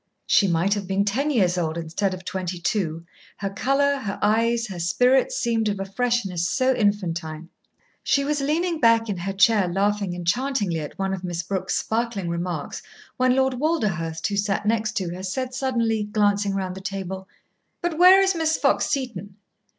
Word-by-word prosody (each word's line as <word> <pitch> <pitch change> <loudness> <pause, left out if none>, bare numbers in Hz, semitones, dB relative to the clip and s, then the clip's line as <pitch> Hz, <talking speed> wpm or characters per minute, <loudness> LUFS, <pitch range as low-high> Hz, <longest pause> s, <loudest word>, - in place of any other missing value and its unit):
She 200 - +4
might 175 +3 +2
have 205 -3 -3
been 195 +1 +1
ten 265 +9 0
years 185 -10 +2
old 160 -1 -2
instead 170 +4 -2
of 185 0 -13
twenty 185 -1 -3
two, 170 -2 -2 0.3
her 195 -1 -3
colour, 280 +6 +1
her 205 -7 -4
eyes, 230 +2 +2
her 190 -5 -7
spirits 250 - +2
seemed 225 -3 0
of 200 -1 -3
a 195 - -3
freshness 195 -5 -1
so 260 0 +2
infantine. 170 -7 -1 0.5
She 280 - +2
was 290 0 -1
leaning 325 +4 0
back 230 -2 +4
in 200 - -2
her 185 +3 -3
chair 200 0 +4
laughing 200 0 0
enchantingly 195 0 -1
at 150 -2 -7
one 195 0 -1
of 190 -1 -5
Miss 175 -1 -3
Brooke's 190 +1 -2
sparkling 220 -5 -2
remarks 170 -3 -4 0.4
when 255 0 +3
Lord 265 0 +2
Walderhurst, 190 - -1
who 200 - -1
sat 200 0 0
next 220 0 0
to 185 -6 -2
her, 180 - -7
said 250 +7 -3
suddenly, 235 -5 0
glancing 205 -1 +1
round 190 -2 -2
the 190 - -9
table: 190 -1 -5 0.5
"But 345 -2 -3
where 375 +2 +8
is 385 0 +2
Miss 320 -2 +1
Fox - - +2
Seton?" 210 - -4
205 Hz, 180 wpm, -24 LUFS, 185-250 Hz, 0.5 s, where